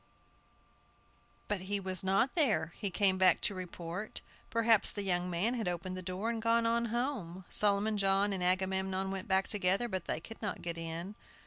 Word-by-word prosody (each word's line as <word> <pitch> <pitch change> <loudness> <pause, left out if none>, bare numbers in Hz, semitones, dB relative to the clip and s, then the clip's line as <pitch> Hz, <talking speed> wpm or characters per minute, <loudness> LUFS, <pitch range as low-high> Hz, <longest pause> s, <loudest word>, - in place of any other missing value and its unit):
But 205 -3 -2
he 205 0 0
was 185 -2 -1
not 195 +7 +2
there! 205 - +1
He 200 - -2
came 190 0 +2
back 185 -2 +5
to 205 - 0
report. 180 +2 -6 0.3
Perhaps 230 -2 +3
the 205 - -4
young 180 -1 +1
man 180 +7 +1
had 225 -6 -2
opened 180 +1 -3
the 185 - -5
door 185 +5 -3
and 230 -1 -3
gone 230 +1 +2
on 235 +1 +2
home. 230 -7 -3
Solomon 210 +1 +3
John 195 +1 +2
and 185 -2 -2
Agamemnon 190 +1 0
went 195 +3 -5
back 190 -1 +2
together, 200 +2 +1
but 190 -5 -3
they - - -2
could 225 +7 -12
not 210 - -4
get 170 -1 -3
in. 165 +4 -5
195 Hz, 185 wpm, -32 LUFS, 185-215 Hz, 0.3 s, back